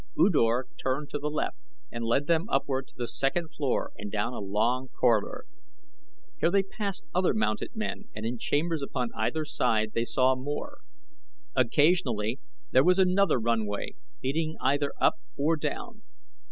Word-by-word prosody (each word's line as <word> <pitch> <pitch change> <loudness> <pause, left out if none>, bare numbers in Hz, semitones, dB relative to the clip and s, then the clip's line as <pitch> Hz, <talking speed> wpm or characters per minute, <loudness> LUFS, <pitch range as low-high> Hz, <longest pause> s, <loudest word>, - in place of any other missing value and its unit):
U 295 - +5
Dor 120 -4 +3 0.2
turned 135 +3 -1
to 145 - -2
the 150 +1 -2
left 155 - -2 0.3
and 120 - -4
led 120 +5 +2
them 170 +6 +1
upward 135 -1 0
to - - -18
the 120 -1 -2
second 155 +8 0
floor 140 -4 -1
and 100 0 -7
down 110 +3 -1
a - - -4
long 110 +6 0
corridor. 115 -5 +1 0.9
Here 165 - +3
they 195 +2 +3
passed 200 0 -4
other 185 -6 +2
mounted 110 - -1
men 215 -1 -3
and 110 +1 -4
in 120 +1 -2
chambers 160 +4 0
upon 125 -3 -2
either 160 -1 0
side 110 -7 +1
they 115 - +1
saw 130 +2 +3
more. 145 - -5 0.8
Occasionally 125 -4 +2 0.3
there - - +6
was 180 +1 +5
another 190 -5 +4
runway 110 -3 -1 0.3
leading 155 +4 -1
either 140 +1 +1
up - - +3 0.2
or 155 +4 +2
down. 160 +9 -4
135 Hz, 160 wpm, -28 LUFS, 115-165 Hz, 0.9 s, there